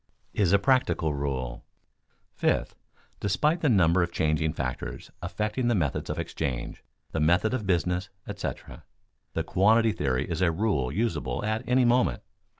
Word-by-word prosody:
[Sidenote: 105 - 0
Is 85 - +2
a - - +8
practical 100 - +2
rule] 65 -4 -3 0.7
Fifth, - - 0 0.4
despite 150 - +1
the 150 - +3
number 90 -5 +4
of 85 0 0
changing 80 -1 +1
factors 65 -5 -5
affecting 105 +7 -2
the 120 - +3
methods 75 -8 -1
of - - -2
exchange, - - -4 0.3
the - - -2
method 90 +9 +3
of 110 -6 -2
business, 90 +1 0 0.2
etc., - - -6 0.5
the - - -1
quantity 110 +4 +4
theory 70 -7 -1
is 85 +1 -3
a 90 - +4
rule 80 - 0
usable 80 - -1
at 110 +1 0
any 125 0 +4
moment. 120 - +2
90 Hz, 150 wpm, -27 LUFS, 75-110 Hz, 0.7 s, a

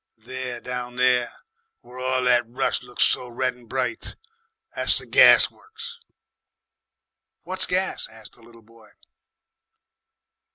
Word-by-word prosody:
"There, 125 +1 -6
down 125 0 -6
there, 125 -1 +2 0.5
where 125 +1 -13
all 130 0 -1
that 125 -1 +4
rus' 130 +3 -1
looks 125 -1 -2
so 125 - +1
red 125 +1 -2
and 120 -2 -20
bright, 135 - -4 0.6
that's - - +5
the - - -2
gas - - +6
works." 460 +2 -11 1.4
"What's 185 0 -1
gas?" 185 +1 -1
asked 110 -1 -12
the 120 - -21
little 115 0 -18
boy. 115 -1 -21
125 Hz, 125 wpm, -23 LUFS, 120-130 Hz, 1.4 s, gas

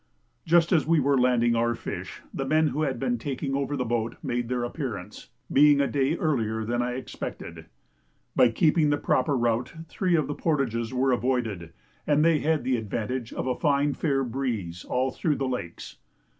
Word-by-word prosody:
Just 170 0 +4
as 160 -5 +3
we 165 -1 +4
were 140 0 +2
landing 125 -2 +3
our 120 +1 +1
fish, - - -7
the 135 - -2
men 155 +3 +2
who 145 +4 -2
had 135 -4 0
been 245 -1 -1
taking 135 -1 -3
over 140 +1 -1
the 125 - -1
boat 115 0 -1
made 120 -1 -2
their 125 -1 -1
appearance, 120 - -6 0.2
being 145 0 +6
a 140 - +3
day 140 +5 0
earlier 110 -8 -1
than 120 +2 0
I 125 0 -1
expected. 130 - -7 0.7
By 125 - +6
keeping 155 +5 +3
the 145 - +2
proper 135 0 +1
route 120 +4 0
three 180 +1 0
of 155 -3 +2
the 145 - -3
portages 125 -8 -1
were 130 +1 +1
avoided, 120 -9 -1 0.4
and 150 +1 +3
they 165 -2 +4
had 155 -2 +1
the 125 0 +1
advantage 115 +3 -3
of - - -4
a 130 - +1
fine 145 -2 +2
fair 135 -3 0
breeze 115 -9 -3
all 130 +1 -1
through 150 +2 0
the 135 - -2
lakes. 125 -10 -5
130 Hz, 185 wpm, -26 LUFS, 120-145 Hz, 0.7 s, being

